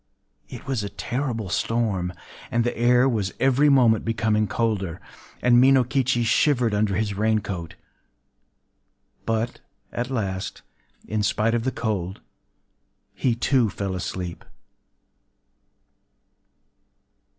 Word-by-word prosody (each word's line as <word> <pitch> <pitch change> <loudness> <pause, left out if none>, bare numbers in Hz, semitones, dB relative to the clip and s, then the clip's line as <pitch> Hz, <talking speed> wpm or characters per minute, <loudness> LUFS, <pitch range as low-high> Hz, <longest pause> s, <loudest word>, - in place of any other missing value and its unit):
It - - -9
was 130 -5 -2
a 100 - -4
terrible 120 -6 -3
storm; 100 -4 0 0.4
and 120 0 +1
the 120 - -1
air 125 +2 +4
was 105 -7 -1
every 135 +2 +4
moment 120 -6 +4
becoming 110 -1 +1
colder; 100 -8 -1 0.4
and 120 0 +6
Minokichi 130 -1 +3
shivered 120 -1 +2
under 105 -1 +1
his 110 -2 -1
rain 110 +2 +1
coat. 90 -6 -5 1.5
But 115 +1 -1 0.3
at 120 +2 -3
last, 100 -7 -3 0.4
in 110 0 -1
spite 110 +2 +1
of 120 0 0
the 130 - +1
cold, 100 -6 -3 0.9
he 125 -3 0
too 120 -1 +2
fell 100 0 -4
asleep. 90 -1 -5
115 Hz, 110 wpm, -24 LUFS, 100-125 Hz, 1.5 s, and